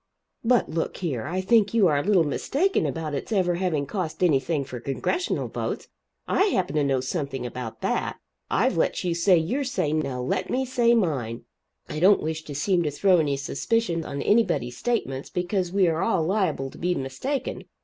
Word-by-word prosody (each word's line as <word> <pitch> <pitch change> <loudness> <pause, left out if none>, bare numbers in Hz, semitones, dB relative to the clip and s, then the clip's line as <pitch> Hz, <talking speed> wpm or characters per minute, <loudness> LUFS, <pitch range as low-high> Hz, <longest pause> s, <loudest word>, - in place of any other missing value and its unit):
"But 245 +1 +3
look 165 +1 -3
here. 140 -9 -3
I 185 +4 -1
think 215 +2 +3
you 220 -4 +5
are 150 -5 +3
a - - -2
little 195 -4 +4
mistaken 290 - 0
about 160 -3 -3
it's 140 - -4
ever 185 -4 +2
having 170 -5 0
cost 180 +2 -3
anything 150 -2 +2
for 130 -2 -7
Congressional 140 - -1
votes. - - -4 0.4
I 390 - +3
happen 185 - 0
to 150 - +3
know 135 -2 +1
something 135 -2 -3
about 120 -2 -6
that. - - -1 0.3
I've - - +2
let - - +1
you 175 -2 0
say 175 +2 +4
your 210 - 0
say 205 - -1
now 140 -5 -1
let 155 +9 -1
me 265 +1 0
say 240 -2 +3
mine. 135 - -1 0.4
I 155 - -4
don't 195 +4 +6
wish 160 0 -2
to 145 - -7
seem 175 +5 +2
to 155 - 0
throw 180 +5 +3
any 145 -3 +1
suspicion 170 +5 -1
on 140 -2 -4
anybody's 145 - +2
statements, 140 - -2
because 180 0 -1
we 190 -1 +3
are 165 0 0
all 190 -5 +1
liable 170 -8 0
to - - -13
be 180 +1 0
mistaken. 255 - -3
170 Hz, 190 wpm, -25 LUFS, 140-200 Hz, 0.4 s, don't